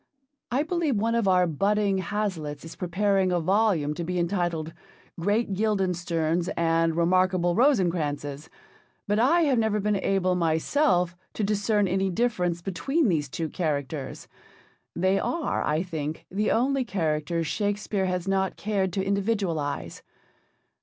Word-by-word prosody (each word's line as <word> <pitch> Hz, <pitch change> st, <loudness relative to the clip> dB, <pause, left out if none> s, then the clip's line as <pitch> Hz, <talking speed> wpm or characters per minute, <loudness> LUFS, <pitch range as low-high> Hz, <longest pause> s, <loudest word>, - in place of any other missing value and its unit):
I 265 Hz, +4 st, +2 dB
believe 320 Hz, -4 st, 0 dB
one 225 Hz, +3 st, +1 dB
of 230 Hz, -3 st, +1 dB
our 180 Hz, -1 st, +4 dB
budding 195 Hz, +4 st, +1 dB
Hazlitts 185 Hz, -7 st, -3 dB
is 165 Hz, -, -9 dB
preparing 190 Hz, +1 st, +1 dB
a 175 Hz, -, +2 dB
volume 185 Hz, -4 st, +2 dB
to 170 Hz, -, -4 dB
be 180 Hz, +2 st, -3 dB
entitled 170 Hz, -3 st, -1 dB, 0.5 s
'Great 205 Hz, +4 st, 0 dB
Guildensterns 175 Hz, -5 st, 0 dB
and 165 Hz, 0 st, +2 dB
Remarkable 180 Hz, 0 st, +2 dB
Rosencrantzes,' 170 Hz, -, +1 dB, 0.6 s
but 205 Hz, +1 st, +1 dB
I 305 Hz, +9 st, +4 dB
have 275 Hz, -7 st, +3 dB
never 220 Hz, -1 st, +1 dB
been 210 Hz, 0 st, +1 dB
able 190 Hz, -1 st, +1 dB
myself 175 Hz, -, +1 dB, 0.2 s
to 215 Hz, -, -1 dB
discern 205 Hz, 0 st, +1 dB
any 190 Hz, +1 st, 0 dB
difference 180 Hz, -5 st, 0 dB
between 225 Hz, -, 0 dB
these 150 Hz, -5 st, 0 dB
two 160 Hz, +4 st, -3 dB
characters. 150 Hz, -4 st, -3 dB, 0.7 s
They 185 Hz, +3 st, +2 dB
are, 335 Hz, -2 st, -1 dB
I 155 Hz, +3 st, 0 dB
think, 160 Hz, -4 st, -5 dB
the 210 Hz, +3 st, 0 dB
only 265 Hz, +3 st, +2 dB
characters 165 Hz, -5 st, -1 dB
Shakespeare 205 Hz, +2 st, -1 dB
has 180 Hz, 0 st, -2 dB
not 190 Hz, 0 st, 0 dB
cared 200 Hz, -3 st, -1 dB
to 195 Hz, 0 st, -1 dB
individualise. 195 Hz, -7 st, -1 dB
185 Hz, 135 wpm, -26 LUFS, 165-210 Hz, 0.7 s, our